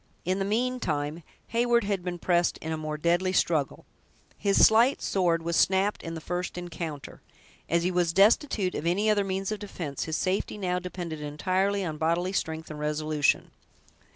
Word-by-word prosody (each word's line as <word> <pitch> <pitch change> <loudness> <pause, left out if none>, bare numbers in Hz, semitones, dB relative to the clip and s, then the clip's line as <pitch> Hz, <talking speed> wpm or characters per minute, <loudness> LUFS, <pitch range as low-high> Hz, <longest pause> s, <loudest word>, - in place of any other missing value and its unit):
In 185 +2 0
the 195 - 0
meantime, 195 -10 -1 0.3
Heyward 235 0 +2
had 200 -3 -2
been 175 -1 -3
pressed 175 0 +1
in 160 - -6
a - - 0
more 155 -1 -4
deadly 175 +4 +1
struggle. 160 -6 0 0.5
His 200 -1 +4
slight 235 +5 +4
sword 170 -4 +1
was 170 0 -1
snapped 190 +4 +2
in 165 -1 -6
the - - -5
first 180 +3 -4
encounter. 165 -4 -6 0.5
As 170 0 +2
he 180 - +1
was 175 -2 +1
destitute 200 - +3
of 165 - -3
any 205 +5 +2
other 205 -1 +2
means 195 +1 -2
of 215 - -3
defense, 170 -9 -5
his 160 -1 -2
safety 190 +2 -1
now 180 -3 -1
depended 175 -3 -6
entirely 185 +6 0
on 155 -3 -4
bodily 170 +4 0
strength 160 -3 -3
and 150 - -7
resolution. 150 -1 0
180 Hz, 175 wpm, -27 LUFS, 160-195 Hz, 0.5 s, His